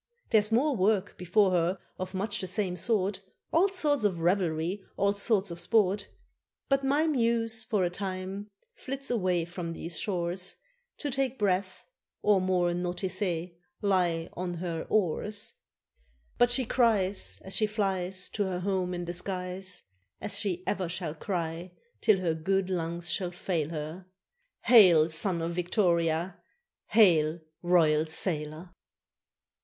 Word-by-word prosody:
There's 215 -1 +4
more 270 +5 +3
work 200 -1 +1
before 185 +2 +2
her 180 +1 +1 0.2
of 185 +1 -5
much 205 +3 -2
the 185 - -2
same 185 0 -1
sort, 195 +1 0 0.3
All 345 +5 +5
sorts 300 - +1
of 185 -5 +1
revelry, 175 +1 0
all 200 0 +2
sorts 200 -2 +1
of 170 - -7
sport. 200 0 +2 0.6
But 275 0 +2
my 285 +4 +2
muse 230 -6 +1
for 215 -4 0
a 175 - 0
time 190 +2 -5 0.2
flits 270 0 -5
away 180 -7 +1
from 170 -1 -5
these 165 0 -5
shores 180 -1 -3 0.4
To 290 - -3
take 265 0 -1
breath, 190 -2 -1 0.4
or, 205 -2 +4
more 180 -1 +1
nauticé, 180 -1 -2 0.3
"lie 175 -4 +1
on 175 0 -4
her 170 -1 -4
oars." 205 +1 0 0.9
But 245 - +5
she 250 +1 +1
cries, 215 -6 +1
As 190 0 -4
she 215 0 +2
flies 190 -3 -1
To 205 - -1
her 180 -1 -3
home 185 -1 -1
in 175 0 -4
the 175 - -4
skies, 185 0 -4 0.4
As 210 - -4
she 185 -3 -2
ever 185 -4 -1
shall 170 -3 -3
cry 170 0 -4 0.3
till 215 - +5
her 170 -3 +1
good 190 +4 0
lungs 170 -1 -2
shall 180 -2 0
fail 175 -3 -2
her, 165 +3 -6 0.6
"Hail, 180 -10 +7
Son 170 +1 +1
of 165 - -2
Victoria! 175 -1 0 0.5
hail, 170 -7 +4 0.2
Royal 160 -3 +3
Sailor!" 160 +1 0
185 Hz, 140 wpm, -29 LUFS, 175-205 Hz, 0.9 s, Hail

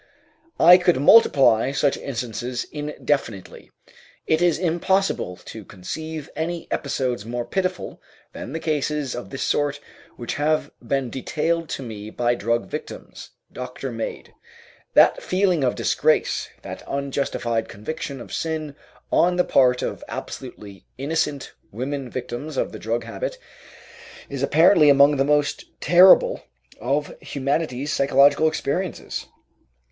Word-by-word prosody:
I 175 +2 +8
could 175 -5 +2
multiply 135 - +5
such 140 0 +2
instances 120 -1 -4
indefinitely. 145 -8 -3 0.6
It 160 +1 +1
is 175 -2 +3
impossible 175 - 0
to 110 - -9
conceive 155 - -7
any 170 +1 -3
episodes 130 -5 -2
more 120 +2 -4
pitiful 190 -1 -3 0.3
than - - -7
the 160 - -3
cases 150 -3 -1
of 120 - -7
this 135 - -4
sort 145 -1 0 0.4
which 120 - -4
have 155 +1 +1
been 135 -3 -2
detailed 165 +4 -2
to 135 - -4
me 105 -3 -7
by 120 +2 0
drug 115 -2 -1
victims, - - -8 0.2
doctor 125 +1 -6
made. 115 -1 -6 0.6
That - - +6
feeling 185 -5 +1
of 125 - +1
disgrace, - - +1
that - - -7
unjustified 135 -4 -2
conviction 135 +5 -6
of 120 - -10
sin 155 -3 -3 0.4
on 180 +1 +3
the 180 - +3
part 125 -1 +3
of - - -4
absolutely 100 -2 -8
innocent 145 0 -2 0.2
women 130 +4 -4
victims 130 +4 -6
of - - -1
the 110 - -8
drug 115 +2 -2
habit, - - -5 0.9
is 140 -2 -5
apparently 155 +2 +5
among 140 +1 +6
the 135 - +3
most 145 0 +1
terrible 180 +2 +6 0.4
of 140 +4 -1
humanity's 140 0 -2
psychological 140 +2 +4
experiences. 160 +3 -3
140 Hz, 125 wpm, -23 LUFS, 125-160 Hz, 0.9 s, I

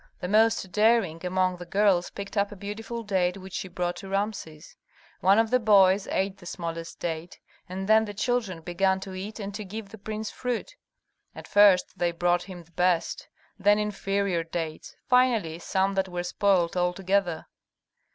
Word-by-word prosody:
The 180 - -4
most 215 -1 +3
daring 210 -6 +2
among 185 0 0
the 175 - -8
girls 195 -2 +2
picked 200 +1 -8
up 200 0 +1
a - - -8
beautiful 220 +4 -6
date 190 -3 0
which 190 -1 -11
she - - -3
brought 175 -1 -3
to 190 +2 -9
Rameses. 195 -6 -4 0.4
One 195 +2 +4
of 225 0 +2
the 255 - +4
boys 195 -3 +5
ate 195 0 -1
the 175 - -11
smallest 165 -1 -6
date, 165 +1 -5 0.3
and 190 +1 -4
then 220 +1 +5
the 205 - -6
children 220 -6 -1
began 190 +3 +1
to 190 -1 -7
eat 200 +4 -6
and 200 -1 -5
to 210 +1 -5
give 205 +1 -7
the 220 - -12
prince 215 +1 -5
fruit. 250 - -4 0.6
At - - -10
first 205 -3 +4
they 175 -1 +2
brought 175 +1 +1
him 180 -2 -9
the 170 - -27
best, 180 -1 0 0.3
then 205 +2 +4
inferior 200 -4 -1
dates, 165 -1 -5
finally 235 - +2
some 190 +2 0
that 190 -1 0
were 175 0 -3
spoilt 180 -1 +1
altogether. 180 -1 0
190 Hz, 175 wpm, -27 LUFS, 175-210 Hz, 0.6 s, boys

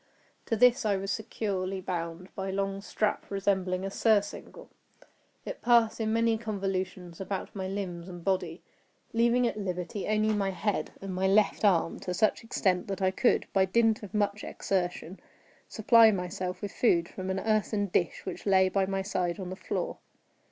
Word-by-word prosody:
To 225 - +1
this 245 +2 +5
I 210 -2 +2
was 195 +1 -3
securely 195 -3 -3
bound 175 0 -5
by 190 0 -4
a - - -2
long 195 0 -2
strap 210 +1 -2
resembling 190 -2 0
a 195 - -4
surcingle. 205 -1 0 0.8
It - - -6
passed 235 -2 +3
in 220 0 0
many 230 0 +2
convolutions 190 -5 -4
about 195 +1 -4
my 190 -1 -3
limbs 190 -3 -5
and 175 -2 -9
body, 185 -3 -1 0.5
leaving 235 +2 +3
at 225 -2 -1
liberty 180 0 -4
only 215 0 +2
my 200 -2 0
head, 200 +2 -1
and 195 -1 -4
my 190 +1 +1
left 205 +2 +3
arm 175 -5 +3
to 180 - -4
such 215 +4 +2
extent 190 -5 0
that 195 -1 -3
I 185 - +3
could, 240 +6 +2
by 190 -1 +4
dint 225 +3 +2
of 205 -1 -8
much 205 0 0
exertion, 180 -1 -3 0.5
supply 225 +1 +6
myself 185 -1 -3
with 200 - -3
food 170 -8 +2
from 185 +1 -6
an 190 0 -1
earthen 215 0 +1
dish 175 -3 -1
which 185 +2 -6
lay 190 -1 +5
by 190 0 +1
my 195 0 -1
side 180 -2 -2
on 185 -1 -5
the - - -4
floor. - - -4
195 Hz, 175 wpm, -29 LUFS, 185-215 Hz, 0.8 s, supply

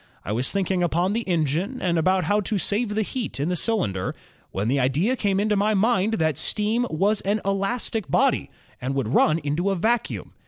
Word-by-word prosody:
I - - -3
was 120 +5 -1
thinking 190 -2 0
upon 175 +3 +1
the 230 - 0
engine 170 - 0
and 170 -2 +1
about 185 +3 +2
how 205 +6 +1
to 205 +1 -2
save 210 +3 -1
the 220 - +1
heat 230 - -4
in 145 +5 0
the 180 - 0
cylinder, 160 - -1 0.3
when 100 +3 -2
the 135 +3 +1
idea 150 - +1
came 200 -5 0
into 210 +1 +1
my 210 +2 +2
mind 215 0 +2
that 160 -7 0
steam 225 +3 0
was 200 +6 +1
an 205 +2 0
elastic 195 - -1
body - - +2 0.3
and 130 +2 -2
would 135 -6 -1
run 155 - +4
into 165 +5 -1
a 195 - +1
vacuum. 225 +6 -1
195 Hz, 200 wpm, -24 LUFS, 155-215 Hz, 0.3 s, run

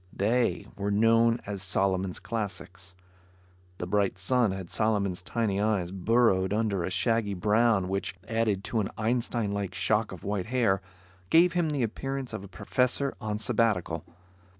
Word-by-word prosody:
They 115 +4 +1
were 100 0 -2
known 115 +3 +3
as 100 -2 -4
Solomon's 95 -1 0
"Classics." 95 -4 -6 0.8
The - - -4
bright 100 0 +1
sun 120 +4 +2
had 95 -2 -5
Solomon's 100 -5 0
tiny 100 0 -1
eyes 100 -5 0
burrowed 95 -1 +2
under 105 -4 0
a - - -2
shaggy 110 +1 +1
brow 110 +3 +3
which, 95 +2 -3
added 110 -4 0
to 115 - -1
an 100 - -1
Einstein 115 -1 0
like 100 -2 -3
shock 110 0 +1
of 95 - -9
white 100 -1 -2
hair, 115 -6 +2 0.5
gave 170 - +5
him 175 -3 +1
the 145 -4 0
appearance 135 +3 -3
of - - -5
a - - -9
professor 125 +8 0
on 105 -2 -2
sabbatical. 105 -7 0
105 Hz, 150 wpm, -28 LUFS, 95-115 Hz, 0.8 s, gave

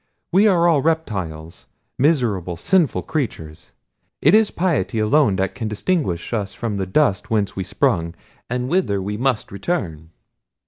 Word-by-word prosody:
We 195 +4 +5
are 175 -4 +4
all 160 -5 +3
reptiles, 95 - -3 0.3
miserable, 115 - +1
sinful 175 - +1
creatures. 80 - -5 0.5
It 155 - +4
is 215 -1 +5
piety 170 -9 -1
alone 110 +1 +3
that 95 +1 -1
can 115 -4 -4
distinguish 105 - -2
us 105 -3 -3
from 110 -4 -3
the 95 -1 -2
dust 105 -3 +1
whence 105 -3 0
we 95 - -2
sprung, 85 -1 0 0.3
and 125 +1 -2
whither 165 - +1
we 100 +2 -3
must 125 0 -1
return." 85 - -3
110 Hz, 145 wpm, -21 LUFS, 95-155 Hz, 0.5 s, We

